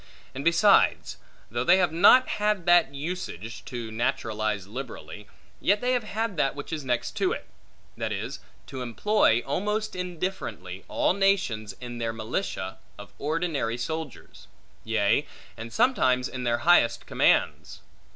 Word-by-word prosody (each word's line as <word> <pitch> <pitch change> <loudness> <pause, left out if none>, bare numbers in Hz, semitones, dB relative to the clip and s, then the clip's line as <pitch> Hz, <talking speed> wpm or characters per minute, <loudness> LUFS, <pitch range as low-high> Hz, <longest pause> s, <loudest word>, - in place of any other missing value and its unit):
And 135 - -5
besides, 195 +5 +3 0.3
though 120 +2 -1
they 175 +8 +5
have 180 -3 +2
not 250 +10 +6
had 210 -4 +1
that 175 -5 +5
usage, 140 - -6
to 120 -3 -6
naturalize 110 -3 -1
liberally, 105 - -8 0.3
yet 205 +2 +2
they 250 +2 0
have 220 -4 -2
that 135 -2 +1
which 145 +2 -7
is 155 -2 -3
next 125 -2 -1
to - - +1
it; - - -7 0.5
that - - -3
is, - - -4 0.3
to 130 -1 -7
employ, 120 - +2
almost 210 +9 -2
indifferently, 165 - -5
all - - +1
nations 190 - 0
in 120 -1 -7
their 115 -1 -2
militia 110 - -4 0.2
of 105 -1 -12
ordinary 150 -6 -1
soldiers; 160 +2 -6 0.4
yea, 110 +5 +1 0.3
and 115 0 -8
sometimes 130 - +2
in 125 -1 -6
their 120 0 +2
highest 140 -10 +4
commands. - - +1
135 Hz, 140 wpm, -26 LUFS, 115-185 Hz, 0.5 s, not